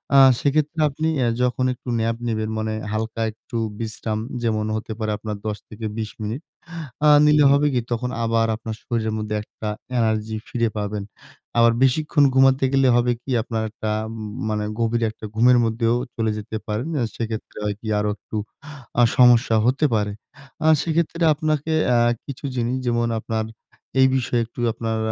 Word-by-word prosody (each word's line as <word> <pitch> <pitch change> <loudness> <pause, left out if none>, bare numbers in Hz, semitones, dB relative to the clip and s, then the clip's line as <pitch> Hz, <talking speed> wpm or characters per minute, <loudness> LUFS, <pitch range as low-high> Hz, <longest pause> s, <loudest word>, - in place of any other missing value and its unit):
আ - - +8 0.2
সেক্ষেত্রে 155 +2 0
আপনি 155 +3 -2 0.2
এ - - +2 0.2
যখন 125 +1 +1
একটু 125 0 -10
ন্যাপ 115 +1 0
নিবেন, 110 -1 -1
মানে 110 0 -2 0.2
হালকা 110 +1 -3
একটু 115 +2 -8 0.2
বিশ্রাম, 110 -1 -3 0.2
যেমন 110 -2 0
হতে 110 0 -4
পারে 110 -1 -1
আপনার 105 -1 -5
১০-২০ 110 0 -5
মিনিট। 110 +7 -3 0.7
আ - - +8 0.2
নিলে 150 0 +5
হবে 145 +1 +4
কি? 125 - +2
তখন 125 +1 -1
আবার 115 0 +2
আপনার 110 -1 -6
শরীরের 110 -2 -1
মধ্যে 105 0 -3
একটা 110 - -8 0.3
এনার্জি 110 -1 0
ফিরে 115 -3 0
পাবেন। 105 0 -3 0.6
আবার 115 0 +6
বেশিক্ষণ 145 +2 +3
ঘুমাতে 135 0 +5
গেলে 135 -1 +4
হবে 120 0 +3
কি? 135 - -6
আপনার 115 -3 -2
একটা 110 -1 -4 0.2
উম 115 - -7 0.3
মানে 105 0 -1 0.2
গভীর 115 0 +1
একটা 110 - -10
ঘুমের 125 +2 +5
মধ্যেও 115 +1 +1 0.2
চলে 110 -1 0
যেতে 110 +1 -5
পারেন। 110 +7 -2
আ - - +2
সেক্ষেত্রে 110 -1 -5
হয় 105 - -1
কি? 110 - -9
আরো 105 0 0
একটু - - -10 0.7
আ - - +7
সমস্যা 120 -2 +6
হতে 135 +5 +2
পারে। 105 -1 0 0.5
আ - - +4 0.2
সেক্ষেত্রে 170 +1 0
আপনাকে 155 0 -1 0.2
আ - - +5 0.3
কিছু 140 0 -7
জিনিস 120 +1 0
যেমন 120 0 +1
আপনার 110 0 -2 0.6
এই 130 - +7
বিষয়ে 120 -2 +1
একটু 120 - -14
আপনার 115 -1 -2
115 Hz, 165 wpm, -22 LUFS, 110-130 Hz, 0.7 s, আ